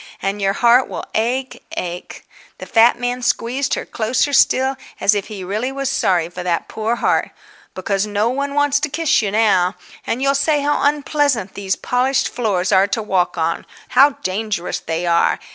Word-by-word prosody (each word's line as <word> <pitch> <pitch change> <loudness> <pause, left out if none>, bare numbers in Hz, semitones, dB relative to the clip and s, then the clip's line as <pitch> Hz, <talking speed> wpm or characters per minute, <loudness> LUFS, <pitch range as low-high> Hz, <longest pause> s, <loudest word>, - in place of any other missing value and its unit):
And 200 +1 -3
your 195 0 +1
heart 240 +4 +4
will - - -6
ache, 255 +4 -2
ache"—the 175 0 -8
fat 230 +1 +4
man 245 +1 -2
squeezed 250 +4 0
her - - -5
closer 250 +5 -1
still, 265 0 +3 0.2
as 200 - +3
if 205 -1 -2
he 205 -4 -7
really 215 +8 -2
was 275 0 -2
sorry 175 -4 +1
for 180 +1 -8
that 175 -2 -1
poor 220 +2 -2
heart—"because 195 -3 -3
no 210 +1 0
one 280 +3 -2
wants 290 0 +2
to 300 - -2
kiss 315 -1 +1
you 210 - -1
now. 200 -3 +2 0.3
And 230 - -1
you'll 275 +1 +2
say 285 +1 +1
how 295 +1 +1
unpleasant 285 -7 0
these 195 -1 -2
polished 260 +1 0
floors 200 -7 -1
are 190 +1 +4
to 220 +2 -2
walk 185 -4 0
on, 165 0 -1 0.3
how 275 +3 +5
dangerous 195 -1 -2
they 165 +2 -3
are. 170 -1 +2
225 Hz, 175 wpm, -19 LUFS, 195-265 Hz, 0.3 s, how